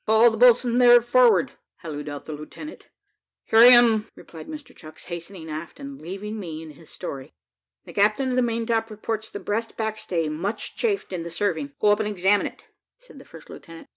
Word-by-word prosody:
call 220 Hz, +2 st, +5 dB
the -, -, -4 dB
boatswain 245 Hz, 0 st, +4 dB
there 245 Hz, -1 st, +8 dB
forward," 240 Hz, -6 st, +3 dB, 0.3 s
hallooed 150 Hz, -2 st, -6 dB
out 145 Hz, -1 st, -8 dB
the 155 Hz, -, -6 dB
lieutenant. 155 Hz, -, -10 dB, 0.6 s
"Here 225 Hz, -, +3 dB
I 235 Hz, -, +10 dB
am, 235 Hz, -3 st, +6 dB
sir," -, -, -27 dB
replied 160 Hz, -2 st, -12 dB
Mr 305 Hz, -2 st, -10 dB
Chucks, 155 Hz, -1 st, -13 dB
hastening 170 Hz, 0 st, -8 dB
aft, 155 Hz, -, -7 dB
and 280 Hz, -1 st, -9 dB
leaving 200 Hz, +6 st, -6 dB
me 160 Hz, -4 st, -7 dB
and 160 Hz, -, -10 dB
his 160 Hz, +2 st, -17 dB
story. 135 Hz, -, -8 dB, 0.5 s
"The -, -, -12 dB
captain 215 Hz, +6 st, +2 dB
of -, -, -1 dB
the 255 Hz, -, +3 dB
maintop 230 Hz, -1 st, -1 dB
reports 220 Hz, 0 st, -5 dB
the 205 Hz, -, -7 dB
breast 225 Hz, +3 st, -4 dB
backstay 215 Hz, -7 st, -2 dB
much 170 Hz, +8 st, -4 dB
chafed 405 Hz, -, -2 dB
in 180 Hz, -, -3 dB
the 170 Hz, -, -6 dB
serving. 165 Hz, -5 st, -2 dB
Go 210 Hz, -, +3 dB
up 205 Hz, +1 st, +3 dB
and 215 Hz, -1 st, -1 dB
examine 200 Hz, +1 st, +2 dB
it," -, -, -13 dB, 0.3 s
said -, -, -16 dB
the -, -, -15 dB
first -, -, -14 dB
lieutenant. 165 Hz, -1 st, -13 dB
210 Hz, 200 wpm, -24 LUFS, 165-235 Hz, 0.6 s, I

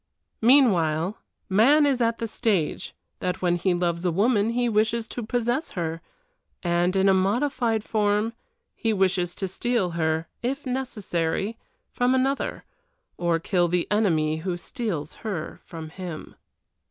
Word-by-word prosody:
Meanwhile, 195 Hz, -, +4 dB, 0.3 s
man 265 Hz, +10 st, +5 dB
is 270 Hz, -3 st, +1 dB
at 230 Hz, 0 st, +2 dB
the 230 Hz, -, -3 dB
stage 210 Hz, -8 st, -1 dB, 0.2 s
that 180 Hz, 0 st, -3 dB
when 175 Hz, -1 st, +3 dB
he 175 Hz, +1 st, +1 dB
loves 175 Hz, -1 st, -1 dB
a 180 Hz, -, +2 dB
woman 205 Hz, +4 st, +2 dB
he 240 Hz, +1 st, +1 dB
wishes 220 Hz, +1 st, +1 dB
to 245 Hz, -, -5 dB
possess 240 Hz, +6 st, -1 dB
her, 165 Hz, -1 st, -2 dB, 0.6 s
and, 175 Hz, +1 st, +1 dB
in 190 Hz, 0 st, +3 dB
a 195 Hz, -, +6 dB
modified 225 Hz, +3 st, +1 dB
form, 210 Hz, +1 st, +1 dB, 0.4 s
he 225 Hz, -1 st, 0 dB
wishes 185 Hz, -3 st, +1 dB
to 195 Hz, -, -2 dB
steal 205 Hz, -1 st, 0 dB
her, 160 Hz, -1 st, 0 dB
if 275 Hz, +4 st, -2 dB
necessary, 210 Hz, -6 st, -2 dB, 0.4 s
from 250 Hz, +1 st, +2 dB
another, 270 Hz, +2 st, -1 dB, 0.5 s
or 170 Hz, -1 st, +1 dB
kill 175 Hz, +1 st, +1 dB
the 175 Hz, 0 st, +1 dB
enemy 160 Hz, -8 st, +2 dB
who 175 Hz, +2 st, -3 dB
steals 175 Hz, -, -4 dB
her 195 Hz, -8 st, -4 dB
from 160 Hz, -2 st, -8 dB
him. 175 Hz, -2 st, -7 dB
195 Hz, 140 wpm, -25 LUFS, 175-235 Hz, 0.6 s, a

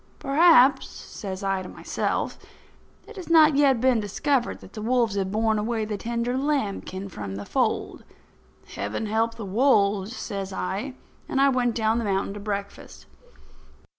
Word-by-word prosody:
"Perhaps," 280 Hz, -2 st, +5 dB
says 190 Hz, -1 st, -8 dB
I 195 Hz, -1 st, 0 dB
to 185 Hz, -, -8 dB
myself, -, -, -3 dB, 0.7 s
"it 445 Hz, -, -12 dB
has 365 Hz, -, -8 dB
not 310 Hz, -3 st, +6 dB
yet 275 Hz, -4 st, +4 dB
been 255 Hz, -1 st, +3 dB
discovered 240 Hz, +5 st, -1 dB
that -, -, -14 dB
the 215 Hz, -, -7 dB
wolves 235 Hz, -1 st, +1 dB
have 195 Hz, -1 st, -2 dB
borne 220 Hz, 0 st, +1 dB
away 220 Hz, 0 st, -1 dB
the 210 Hz, 0 st, -3 dB
tender 235 Hz, +3 st, -2 dB
lambkin 210 Hz, -9 st, -2 dB
from 100 Hz, -, -7 dB
the 100 Hz, +1 st, -6 dB
fold. -, -, -1 dB, 0.7 s
Heaven 105 Hz, -, -3 dB
help 225 Hz, +2 st, 0 dB
the 220 Hz, -, -7 dB
wolves!" 205 Hz, -1 st, +2 dB
says 195 Hz, -4 st, -5 dB
I, 200 Hz, +8 st, -4 dB, 0.3 s
and 270 Hz, -, 0 dB
I 275 Hz, 0 st, +5 dB
went 245 Hz, -3 st, +1 dB
down 220 Hz, 0 st, +1 dB
the 230 Hz, -, -3 dB
mountain 195 Hz, 0 st, -1 dB
to 205 Hz, -, -7 dB
breakfast. 200 Hz, -1 st, -6 dB
220 Hz, 160 wpm, -25 LUFS, 200-255 Hz, 0.7 s, not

